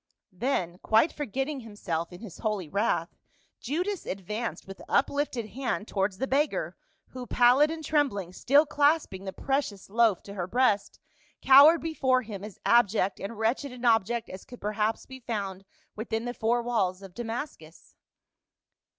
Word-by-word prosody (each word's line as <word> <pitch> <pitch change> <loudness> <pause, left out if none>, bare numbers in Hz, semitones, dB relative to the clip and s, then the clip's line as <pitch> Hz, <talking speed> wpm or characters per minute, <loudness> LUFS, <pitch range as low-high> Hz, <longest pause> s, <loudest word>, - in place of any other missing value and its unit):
Then 180 -5 -2
quite 220 +10 +3
forgetting 275 +1 -3
himself 185 -8 -4
in 175 - -11
his 215 -7 -10
holy 210 -6 -2
wrath, 195 -2 -1 0.4
Judas 355 - -3
advanced 210 +5 -4
with 195 0 -10
uplifted 265 -6 0
hand 245 -3 -3
towards 195 -1 -1
the 265 - -1
beggar, 285 +3 0 0.3
who 250 -1 -8
pallid 250 +6 +5
and 320 -1 -5
trembling, 240 - 0
still 285 +10 +4
clasping 290 - +1
the 190 - -4
precious 270 -7 -3
loaf 225 -4 +3
to 200 - -9
her 180 -3 -4
breast, 215 -3 +1 0.5
cowered 285 +5 +8
before 260 -6 +1
him, 205 -3 -8
as 210 -2 -9
abject 210 -4 +3
and 205 +3 -6
wretched 235 +5 -1
an 250 0 -7
object 230 0 +2
as 185 - -9
could 245 - -12
perhaps 215 +1 -1
be 260 0 -10
found 200 -5 -4 0.3
within 225 +1 -3
the 245 - -3
four 235 +1 0
walls 200 -6 -1
of 190 -2 -11
Damascus. 225 - -7
230 Hz, 150 wpm, -28 LUFS, 195-265 Hz, 0.5 s, cowered